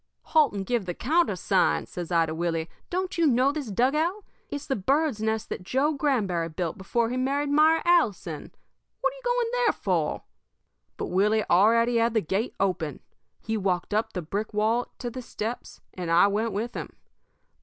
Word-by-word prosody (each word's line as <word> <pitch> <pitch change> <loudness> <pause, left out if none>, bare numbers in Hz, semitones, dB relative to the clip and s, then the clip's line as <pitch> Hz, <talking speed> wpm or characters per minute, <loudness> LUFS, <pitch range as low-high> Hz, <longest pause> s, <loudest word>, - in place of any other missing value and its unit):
"'Halt 310 -4 +4
and 200 -1 -4
give 230 -3 -1
the 175 - -3
countersign,' 215 - +1
says 175 -1 -7
I 165 -1 +4
to 160 - -4
Willie. 165 -1 -1 0.2
'Don't 365 0 -2
you 330 - +4
know 260 +1 +3
this 290 -3 -4
dugout? 305 - +1 0.2
It's 285 0 -5
the 270 - -1
bird's 270 +3 +1
nest 220 0 -1
that - - -4
Joe 270 +11 +1
Granberry 210 - 0
built 165 0 -3
before 230 +4 -1
he 250 - -2
married 280 +3 0
Myra 315 +2 +4
Allison. 205 - +1 0.5
What - - +1
you - - -13
going 485 -1 0
there - - +2
for?' - - -1 0.7
"But - - -4
Willie 210 +4 +2
already 230 +6 +4
had 230 0 +2
the 220 - +4
gate 195 +8 -2
open. 180 -6 -1 0.4
He 220 0 -2
walked 190 -1 -1
up 215 +2 0
the 180 - -3
brick 205 +6 -4
walk 225 +3 0
to 240 - -5
the 255 +2 -6
steps, 230 0 -6
and 180 -2 -5
I 170 +3 +6
went 215 +3 0
with 225 +4 -3
him. - - -7
225 Hz, 180 wpm, -26 LUFS, 190-285 Hz, 0.7 s, I